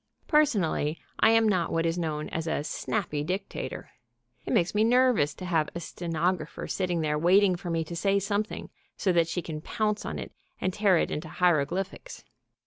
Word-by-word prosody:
Personally 195 - +2 0.2
I 220 - +6
am 225 0 +5
not 185 -5 +1
what 165 0 +1
is 165 0 +1
known 155 -2 -2
as 165 0 -3
a 155 - -1
"snappy" 155 -2 -2
dictator. 190 +5 -4 0.6
It - - -2
makes 180 -7 +2
me 210 +1 +3
nervous 240 - +3
to 185 - -7
have 165 -4 +1
a - - -2
stenographer 170 0 -2
sitting 180 -3 -1
there 150 -1 0
waiting 185 +3 +5
for 175 0 -6
me 165 -1 0
to 170 +2 -7
say 195 +3 +2
something 205 +2 -2 0.3
so 195 - +1
that 170 -2 +3
she 175 +1 -3
can 155 -2 -5
pounce 210 +3 -1
on - - -4
it - - -6 0.3
and 185 - -1
tear 200 -3 +4
it - - 0
into 155 +1 -4
hieroglyphics. 180 - -1
180 Hz, 185 wpm, -28 LUFS, 165-200 Hz, 0.6 s, I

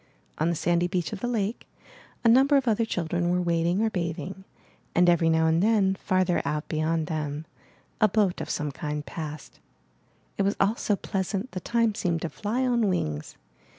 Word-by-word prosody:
On 160 +2 +2
the 170 - 0
sandy 175 +2 +1
beach 180 +1 -2
of 210 - -5
the 245 - -2
lake, 225 -1 -2 0.6
a - - +4
number 270 +5 +6
of 265 -2 0
other 225 0 +2
children 175 -3 -1
were 180 +1 +2
wading 175 +3 +1
or 220 - +1
bathing, 180 +1 -4 0.5
and 180 +1 +5
every 170 -1 +4
now 160 0 +3
and 160 +1 +3
then, 205 -2 +3
farther 185 -2 +1
out 150 +1 -2
beyond 160 0 0
them, 150 -1 -3 0.6
a 215 - +7
boat 205 -5 +1
of - - -5
some 150 -1 -2
kind 150 +1 -4
passed. 155 -2 -7 0.8
It - - +4
was 200 +1 +1
all 200 +3 +3
so 210 - 0
pleasant, 195 +4 -3
the 185 - -4
time 230 +2 +1
seemed 175 -5 -1
to 170 - -2
fly 230 +9 -2
on 240 -4 +2
wings. 75 - -3
180 Hz, 185 wpm, -26 LUFS, 165-215 Hz, 0.8 s, a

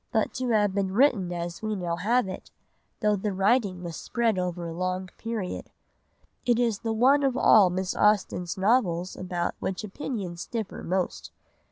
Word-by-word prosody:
but 220 - +1
to 255 -1 -2
have 210 -3 +3
been 195 -1 0
written 225 -8 +3
as 175 0 -4
we 215 -1 -2
now 175 -3 -2
have 220 +6 +1
it, 185 - -7 0.5
though 210 -1 +3
the 205 +1 -2
writing 195 -1 +1
was 170 -2 -5
spread 230 -2 0
over 180 -1 -3
a 165 - -5
long 185 +2 -2
period. 225 -5 -4 0.7
It 240 -2 +2
is 230 -4 +1
the 225 - -2
one 260 +6 +4
of 270 -2 +1
all 205 -6 +6
Miss 185 +1 -2
Austen's 195 -3 +1
novels 190 -4 +1
about 180 -2 -2
which 190 +1 -3
opinions 195 -5 -5
differ 225 -4 -4
most. 185 +1 -2
195 Hz, 170 wpm, -27 LUFS, 180-225 Hz, 0.7 s, all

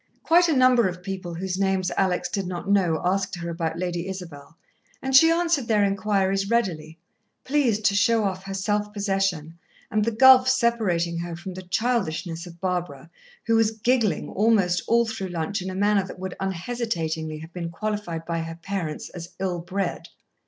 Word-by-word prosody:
Quite 345 +2 +5
a - - +3
number 255 -4 +5
of 180 0 -6
people 185 -3 -5
whose 185 +2 -3
names 190 -2 +1
Alex 180 -2 +1
did 195 +1 -3
not 180 +1 -5
know 185 -6 +2
asked 190 +1 0
her 170 -1 -5
about 165 -1 -3
Lady 175 0 -3
Isabel, 165 -5 -8 0.4
and 265 0 -1
she 325 +5 +8
answered 330 -6 +1
their 210 -2 +3
inquiries 195 -1 0
readily, 165 -9 -1 0.5
pleased 250 -7 +1
to 200 - +3
show 225 +2 +3
off 190 -1 -3
her 195 - -5
self 210 +1 -1
possession, 195 -6 -1 0.3
and 215 -1 +2
the 230 - +1
gulf 255 +2 +7
separating 215 -10 +1
her 170 0 -5
from 185 +2 -7
the 185 - -7
childishness 180 -5 -2
of 170 0 -13
Barbara, 175 -5 -3 0.3
who 230 - +2
was 225 -1 +4
giggling 220 -4 0
almost 200 -5 +2
all 235 0 +4
through 220 -4 -4
lunch 180 +3 -3
in 185 - -4
a 185 - -5
manner 205 0 +2
that - - -9
would 190 0 -6
unhesitatingly 170 -5 -3
have 160 +2 -11
been 170 -2 -4
qualified 175 -3 -4
by 170 0 -2
her 165 0 -5
parents 170 -3 -4
as 175 -1 -8
ill 185 -2 -2
bred. 180 +1 -4
190 Hz, 180 wpm, -24 LUFS, 170-215 Hz, 0.5 s, she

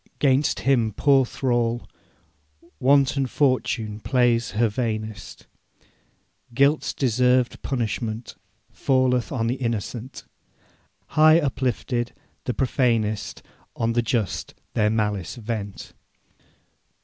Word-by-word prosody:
'Gainst 135 -6 +2
him, 120 -2 +2
poor 135 +2 +3
thrall, 120 -2 -1 0.9
Wanton 135 0 +3
Fortune 125 -6 0
plays 120 -1 +2
her 115 +1 +4
vainest. 110 -2 -4 1.1
Guilt's 140 +4 +3
deserved 125 0 +1
punishment 115 -2 -3 0.4
Falleth 130 -3 +1
on 120 -5 -1
the 120 +3 -1
innocent; 120 +2 -4 0.9
High 155 +2 +6
uplifted, 125 -4 -2 0.3
the 125 - -1
profanest 115 -5 0 0.3
On 115 0 0
the 120 - +2
just 115 -3 -2 0.2
their 105 -1 +2
malice 105 -5 -1
vent. 110 -4 -6
120 Hz, 90 wpm, -24 LUFS, 110-130 Hz, 1.1 s, High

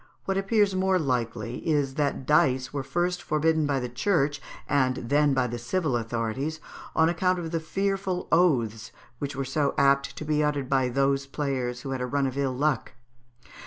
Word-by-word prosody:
What 195 - 0
appears 195 0 +2
more 190 0 +2
likely 120 -6 -2
is, 145 -4 0
that 140 -2 -1
dice 130 -4 +2
were 140 - -1
first 175 +5 -1
forbidden 155 0 +1
by 140 -2 +1
the 125 - -3
Church, 145 +2 0 0.3
and 130 -3 +2
then 145 +3 +2
by 130 -1 +2
the 120 0 -4
civil 140 +3 -1
authorities, 120 +6 -2 0.4
on 160 - +4
account 180 +2 +1
of 165 -2 -4
the 165 - 0
fearful 195 +2 -2
oaths 120 -11 +2 0.3
which 140 -1 -4
were 135 0 -2
so 140 +2 0
apt 140 0 +2
to 155 - -5
be 150 0 +1
uttered 145 -3 0
by 130 -2 +2
those 135 +2 +1
players 130 -4 -2
who 135 - -5
had 130 -1 -3
a 125 - -1
run 140 +1 0
of 130 -1 -2
ill 135 -2 -1
luck. 145 -3 0
140 Hz, 185 wpm, -26 LUFS, 130-160 Hz, 0.4 s, on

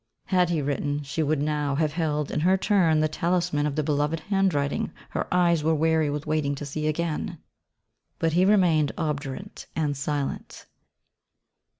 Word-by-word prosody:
Had 180 -2 +2
he 160 -4 0
written 145 +1 -1
she 140 +3 -3
would 155 -1 +1
now 150 -2 0
have 150 0 0
held 150 -3 -1
in - - -1
her 185 +5 +3
turn 180 -6 +3
the 155 - +3
talisman 170 -1 0
of 145 - -3
the 155 - 0
beloved 150 +2 0
handwriting 185 -7 0 0.2
her - - -2
eyes 170 -3 +3
were 160 +1 +2
weary 160 0 +2
with 145 0 -3
waiting 155 -2 0
to 145 - -6
see 155 +2 -3
again. 155 0 -2 0.8
But 165 -1 0
he 180 +2 +4
remained 180 -7 +3
obdurate 150 +4 -4
and 150 -3 0
silent. 140 0 -4
155 Hz, 165 wpm, -26 LUFS, 145-170 Hz, 0.8 s, he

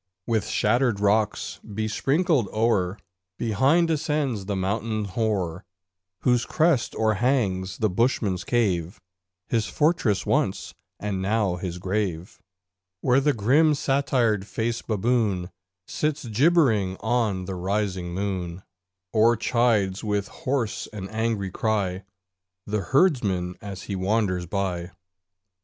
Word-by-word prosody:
With 110 -3 0
shattered 120 0 +2
rocks 105 +1 +1
besprinkled 115 - 0
o'er, 105 -4 +1 0.4
Behind 135 - +3
ascends 150 -9 -1
the 100 - -1
mountain 105 +3 -1
hoar, 95 -5 -1 0.6
Whose 125 -2 +3
crest 155 -6 +1
o'erhangs 110 -4 +1
the 110 - +2
Bushman's 105 -3 +1
cave 95 -6 0 0.5
(His 115 -2 0
fortress 150 - +1
once - - 0 0.3
and 100 -2 -2
now 100 -2 +1
his 90 -1 -4
grave), 90 -2 -3 0.6
Where 125 +1 +4
the 145 +1 +2
grim 145 +8 +3
satyr 130 -6 +1
faced 115 +4 -3
baboon 105 -4 0 0.3
Sits 150 +3 -2
gibbering 115 - +3
on 110 -5 0
the 95 - -4
rising 95 -1 -2
moon, 95 -2 -3 0.5
Or 115 +1 +4
chides 110 -5 +1
with 105 -2 -1
hoarse 130 -5 -2
and 100 -2 -7
angry 110 -3 -1
cry 100 -3 -1 0.6
The 105 0 -1
herdsman 105 - +2
as 100 -4 -7
he 100 - -4
wanders 95 -2 0
by. 90 -2 -3
105 Hz, 110 wpm, -25 LUFS, 95-120 Hz, 0.6 s, Where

